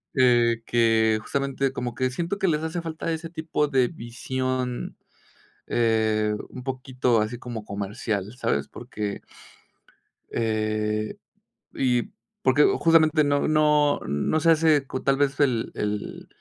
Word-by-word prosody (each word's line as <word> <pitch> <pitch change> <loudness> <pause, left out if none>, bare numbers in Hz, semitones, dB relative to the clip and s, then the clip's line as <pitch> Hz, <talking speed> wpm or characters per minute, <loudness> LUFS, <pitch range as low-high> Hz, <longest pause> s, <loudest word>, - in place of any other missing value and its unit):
eh, 120 -3 +4
que 110 -2 +3
justamente 135 0 -1
como 125 -3 -4
que 130 0 0
siento 170 +8 -3
que 195 - 0
les 150 -1 0
hace 165 +2 -3
falta 165 0 -4
ese 160 +1 -5
tipo 160 -2 -1
de 130 -3 +3
visión, 130 -1 -4 0.7
eh, 110 -2 +1 0.2
un 125 - -9
poquito 130 -3 0
así 110 +3 -3
como 120 -3 -7
comercial, 100 +1 -4
¿sabes?, - - -1
porque 105 -1 -5 1.1
eh, 110 -1 -1 0.6
y, 125 -2 0 0.3
porque 135 +3 +4
justamente 160 -2 +4
no 145 0 +1
no 150 -1 +3
no 75 - 0
se 165 0 +5
hace 155 -3 +3
cu 130 - -5
tal 135 0 +2
vez 140 0 0
el 125 -6 +1
el 105 0 -4
130 Hz, 130 wpm, -25 LUFS, 110-150 Hz, 1.1 s, se